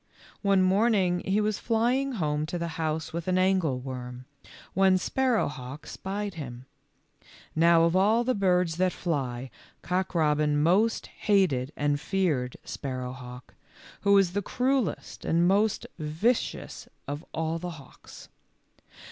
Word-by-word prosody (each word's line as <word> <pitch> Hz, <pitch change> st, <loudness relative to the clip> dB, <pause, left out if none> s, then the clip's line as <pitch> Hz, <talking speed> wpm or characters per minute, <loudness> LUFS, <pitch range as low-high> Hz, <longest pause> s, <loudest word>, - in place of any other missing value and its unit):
One 195 Hz, -2 st, +3 dB
morning 190 Hz, -2 st, +3 dB
he 195 Hz, +2 st, +2 dB
was 215 Hz, -1 st, 0 dB
flying 245 Hz, +4 st, +1 dB
home 150 Hz, -6 st, -1 dB
to 175 Hz, -, -3 dB
the 170 Hz, 0 st, -3 dB
house 160 Hz, 0 st, -2 dB
with 170 Hz, +1 st, -4 dB
an 185 Hz, 0 st, +2 dB
angleworm, 130 Hz, -9 st, -1 dB, 0.5 s
when 190 Hz, 0 st, +4 dB
Sparrowhawk 155 Hz, -, -1 dB
spied 200 Hz, +1 st, -4 dB
him. 130 Hz, -6 st, -8 dB, 0.9 s
Now 165 Hz, +1 st, +5 dB
of 170 Hz, +1 st, +2 dB
all 215 Hz, +5 st, +4 dB
the 255 Hz, +1 st, +1 dB
birds 180 Hz, -5 st, +1 dB
that 185 Hz, 0 st, +2 dB
fly, 130 Hz, -6 st, -3 dB, 0.3 s
Cock 185 Hz, +1 st, -1 dB
robin 150 Hz, -2 st, +2 dB
most 195 Hz, +9 st, +2 dB
hated 175 Hz, -11 st, +1 dB
and 145 Hz, -1 st, 0 dB
feared 150 Hz, -11 st, 0 dB
Sparrowhawk, 125 Hz, -2 st, -6 dB, 0.5 s
who 200 Hz, 0 st, +4 dB
is 185 Hz, -3 st, +3 dB
the 205 Hz, -, 0 dB
cruellest 250 Hz, -, -1 dB
and 170 Hz, +1 st, +2 dB
most 205 Hz, +3 st, +2 dB
vicious 160 Hz, +11 st, -1 dB, 0.2 s
of 145 Hz, +3 st, -4 dB
all 160 Hz, +1 st, -2 dB
the 180 Hz, +1 st, -5 dB
hawks. 135 Hz, -3 st, -14 dB
175 Hz, 130 wpm, -27 LUFS, 145-200 Hz, 0.9 s, Now